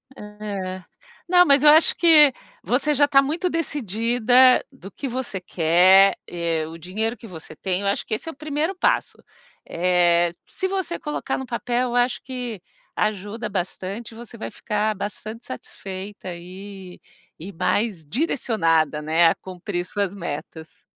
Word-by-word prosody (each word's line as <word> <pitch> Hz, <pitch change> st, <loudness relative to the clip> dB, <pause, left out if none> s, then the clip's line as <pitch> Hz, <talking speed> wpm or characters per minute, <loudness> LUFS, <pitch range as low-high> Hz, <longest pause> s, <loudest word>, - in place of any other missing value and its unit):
É. 200 Hz, -3 st, -6 dB, 0.4 s
Não, 355 Hz, 0 st, +6 dB
mas 280 Hz, -3 st, +4 dB
eu 300 Hz, -, +8 dB
acho 315 Hz, +2 st, +6 dB
que 310 Hz, -5 st, +6 dB, 0.3 s
você 285 Hz, +5 st, +1 dB
já 290 Hz, +1 st, +4 dB
tá 275 Hz, -1 st, +5 dB
muito 320 Hz, +6 st, -1 dB
decidida 245 Hz, -, +3 dB
do 230 Hz, -7 st, -12 dB
que 280 Hz, -, -6 dB
você 245 Hz, -5 st, -3 dB
quer, 180 Hz, +3 st, +5 dB
eh, 170 Hz, -2 st, -2 dB
o 165 Hz, +1 st, -9 dB
dinheiro 215 Hz, +7 st, -3 dB
que 225 Hz, 0 st, -12 dB
você 160 Hz, -4 st, -9 dB
tem, 185 Hz, +3 st, -2 dB
eu 200 Hz, -, -2 dB
acho 200 Hz, -, 0 dB
que 215 Hz, -, -2 dB
esse 215 Hz, -, -8 dB
é -, -, -3 dB
o -, -, -16 dB
primeiro 305 Hz, +5 st, -2 dB
passo. -, -, 0 dB, 0.5 s
Eh, 175 Hz, -1 st, +2 dB, 0.2 s
se 375 Hz, -, -2 dB
você 375 Hz, -3 st, -2 dB
colocar 295 Hz, -3 st, -3 dB
no 265 Hz, -, -5 dB
papel, 245 Hz, +1 st, -1 dB
eu 240 Hz, -, -3 dB
acho 245 Hz, 0 st, +2 dB
que 250 Hz, -5 st, -6 dB, 0.4 s
ajuda 210 Hz, +2 st, -2 dB
bastante, 195 Hz, +4 st, -5 dB
você 235 Hz, 0 st, -11 dB
vai -, -, -5 dB
ficar 210 Hz, 0 st, -1 dB
bastante 215 Hz, +3 st, -6 dB
satisfeita 190 Hz, +7 st, -8 dB
e 185 Hz, +1 st, -10 dB, 0.4 s
e 195 Hz, +4 st, -8 dB
mais 190 Hz, 0 st, -1 dB
direcionada, 165 Hz, -, +1 dB
né, 160 Hz, +3 st, +4 dB
a 165 Hz, -, +3 dB
cumprir 180 Hz, -1 st, -5 dB
suas 200 Hz, -2 st, -2 dB
metas. 160 Hz, -3 st, -8 dB
210 Hz, 155 wpm, -23 LUFS, 180-255 Hz, 0.5 s, eu